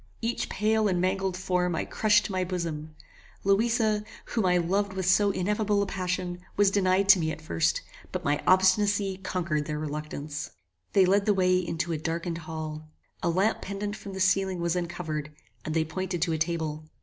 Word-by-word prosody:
Each 230 Hz, +1 st, -2 dB
pale 215 Hz, +1 st, +2 dB
and 180 Hz, -3 st, +1 dB
mangled 190 Hz, 0 st, 0 dB
form 180 Hz, -2 st, 0 dB
I -, -, -1 dB
crushed 210 Hz, -1 st, +3 dB
to -, -, -4 dB
my 185 Hz, -1 st, 0 dB
bosom. 165 Hz, -4 st, -4 dB, 0.5 s
Louisa, 215 Hz, +1 st, +2 dB, 0.2 s
whom 220 Hz, -5 st, 0 dB
I 180 Hz, 0 st, +4 dB
loved 195 Hz, +3 st, 0 dB
with 190 Hz, -1 st, -2 dB
so 195 Hz, +3 st, +4 dB
ineffable 205 Hz, +2 st, +1 dB
a -, -, -1 dB
passion, 180 Hz, -1 st, -3 dB, 0.2 s
was 200 Hz, -1 st, +5 dB
denied 195 Hz, 0 st, +2 dB
to 195 Hz, -2 st, +9 dB
me 160 Hz, -1 st, 0 dB
at 155 Hz, -, -6 dB
first, 80 Hz, -, 0 dB, 0.3 s
but -, -, -3 dB
my 145 Hz, +1 st, +1 dB
obstinacy 190 Hz, +1 st, +3 dB
conquered 170 Hz, -5 st, -2 dB
their 150 Hz, 0 st, -3 dB
reluctance. 150 Hz, -1 st, -5 dB, 0.4 s
They 195 Hz, -2 st, +6 dB
led 200 Hz, +3 st, +2 dB
the 205 Hz, -, +4 dB
way 185 Hz, -1 st, +3 dB
into 170 Hz, -1 st, -2 dB
a 160 Hz, -, -1 dB
darkened 165 Hz, +2 st, -3 dB
hall. 155 Hz, -1 st, -6 dB, 0.3 s
A 175 Hz, -, +1 dB
lamp 190 Hz, +6 st, +1 dB
pendant 205 Hz, +1 st, -4 dB
from 200 Hz, -, -9 dB
the 190 Hz, -, -5 dB
ceiling 190 Hz, 0 st, +2 dB
was 170 Hz, 0 st, 0 dB
uncovered, 170 Hz, -4 st, -3 dB, 0.3 s
and 155 Hz, -, -3 dB
they 160 Hz, -1 st, +2 dB
pointed 175 Hz, +1 st, -2 dB
to 170 Hz, -3 st, 0 dB
a -, -, 0 dB
table. 155 Hz, -2 st, -2 dB
185 Hz, 185 wpm, -27 LUFS, 160-195 Hz, 0.5 s, to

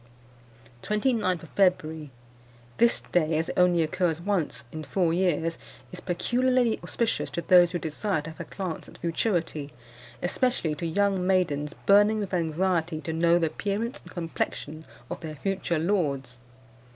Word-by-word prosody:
"Twenty 210 Hz, +5 st, +1 dB
ninth 185 Hz, -7 st, 0 dB
of 165 Hz, -, -11 dB
February. 160 Hz, -6 st, +1 dB, 0.7 s
This 235 Hz, 0 st, +4 dB
day, 160 Hz, -2 st, +1 dB
as 160 Hz, -, -1 dB
it -, -, -4 dB
only 175 Hz, -2 st, +4 dB
occurs 160 Hz, +1 st, 0 dB
once 175 Hz, -6 st, -1 dB
in 155 Hz, 0 st, -6 dB
four 170 Hz, +1 st, +1 dB
years, 165 Hz, -2 st, 0 dB, 0.3 s
is 180 Hz, -, -7 dB
peculiarly 245 Hz, +6 st, +1 dB
auspicious 235 Hz, -1 st, -1 dB
to 170 Hz, -, -4 dB
those 175 Hz, -1 st, +6 dB
who 175 Hz, -, -1 dB
desire 160 Hz, +1 st, -2 dB
to 165 Hz, -, -7 dB
have 160 Hz, -, -16 dB
a -, -, -3 dB
glance 185 Hz, -5 st, -5 dB
at -, -, -14 dB
futurity, 165 Hz, -4 st, -1 dB, 0.5 s
especially 175 Hz, -3 st, 0 dB
to 170 Hz, +3 st, -4 dB
young 195 Hz, +1 st, +1 dB
maidens 150 Hz, -6 st, +1 dB
burning 205 Hz, +2 st, +5 dB
with 200 Hz, -3 st, -4 dB
anxiety 170 Hz, -1 st, 0 dB
to 160 Hz, +2 st, -4 dB
know 170 Hz, +1 st, +4 dB
the 170 Hz, -, +2 dB
appearance 205 Hz, -, -2 dB
and -, -, -14 dB
complexion 160 Hz, -2 st, -4 dB, 0.3 s
of -, -, -4 dB
their 155 Hz, -2 st, -7 dB
future 185 Hz, +1 st, -1 dB
lords. 145 Hz, -8 st, -1 dB
175 Hz, 155 wpm, -27 LUFS, 160-195 Hz, 0.7 s, those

